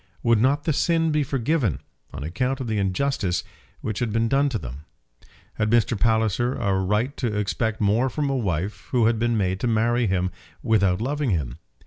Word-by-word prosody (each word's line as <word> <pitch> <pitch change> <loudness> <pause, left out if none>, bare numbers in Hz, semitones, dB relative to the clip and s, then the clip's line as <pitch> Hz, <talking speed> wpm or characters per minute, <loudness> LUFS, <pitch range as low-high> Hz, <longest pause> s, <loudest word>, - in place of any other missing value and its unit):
Would 115 -2 +3
not 140 +4 +2
the 155 - +1
sin 165 +2 +2
be 150 0 +2
forgiven 135 - 0 0.3
on 70 0 -6
account 125 - -1
of 130 - -3
the 110 -2 -1
injustice 95 -2 0 0.4
which 110 -2 -3
had 120 -3 -1
been 115 +1 +1
done 140 +4 +2
to 125 - -2
them? 65 - -8 0.7
Had 105 - -1
Mr. 115 +1 +3
Palliser 110 +2 +1
a 100 - 0
right 105 +9 0
to 110 -5 -1
expect 110 +2 -1
more 110 +5 +2
from 145 +3 -2
a 135 - 0
wife 100 -3 -2
who 120 -3 +2
had 115 0 +2
been 120 0 +1
made 95 -2 0
to 125 - -1
marry 120 +1 +2
him 90 -1 0 0.3
without 100 -4 +2
loving 145 +2 -1
him? 80 - -2
115 Hz, 190 wpm, -24 LUFS, 100-130 Hz, 0.7 s, Would